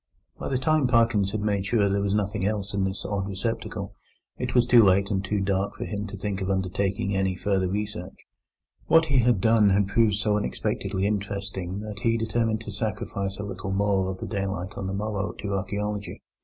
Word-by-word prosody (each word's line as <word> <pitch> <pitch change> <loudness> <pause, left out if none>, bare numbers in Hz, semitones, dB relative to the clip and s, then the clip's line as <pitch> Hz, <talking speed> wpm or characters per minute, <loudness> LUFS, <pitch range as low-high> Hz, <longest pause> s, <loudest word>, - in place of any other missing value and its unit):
By - - -4
the 130 - +1
time 150 +1 +2
Parkins 115 -5 +3
had 105 +1 -3
made 100 -2 0
sure 105 +1 +2
that 100 - +3
there 100 +1 +1
was 100 0 +1
nothing 105 -1 -1
else 100 -1 -1
in 100 -1 +1
this 95 +1 -3
odd 100 -2 -2
receptacle, 100 +4 -3 0.4
it - - -4
was 120 -1 +5
too 120 -1 +7
late 100 +1 +4
and 95 -1 0
too 100 +1 -1
dark 95 0 0
for - - -5
him 105 0 -4
to 100 - -7
think 100 -1 -3
of 95 - -2
undertaking 95 +1 0
any 95 -1 +1
further 95 -1 0
search. 95 -3 -8 0.7
What 165 0 +6
he 140 -4 +3
had 120 -4 +3
done 110 -1 +5
had 100 0 +2
proved 110 -1 +3
so 105 0 +1
unexpectedly 95 +4 -2
interesting 100 -2 -3
that 105 -1 -6
he 115 0 +2
determined 110 0 0
to 105 - -7
sacrifice 100 -2 -3
a 105 - -4
little 100 0 -5
more 100 -1 +1
of 95 - -4
the - - -6
daylight 95 -2 -3
on 95 - -4
the 95 - -3
morrow 100 -3 -2
to 100 -1 -4
archaeology. 105 +1 -3
100 Hz, 210 wpm, -26 LUFS, 95-105 Hz, 0.7 s, too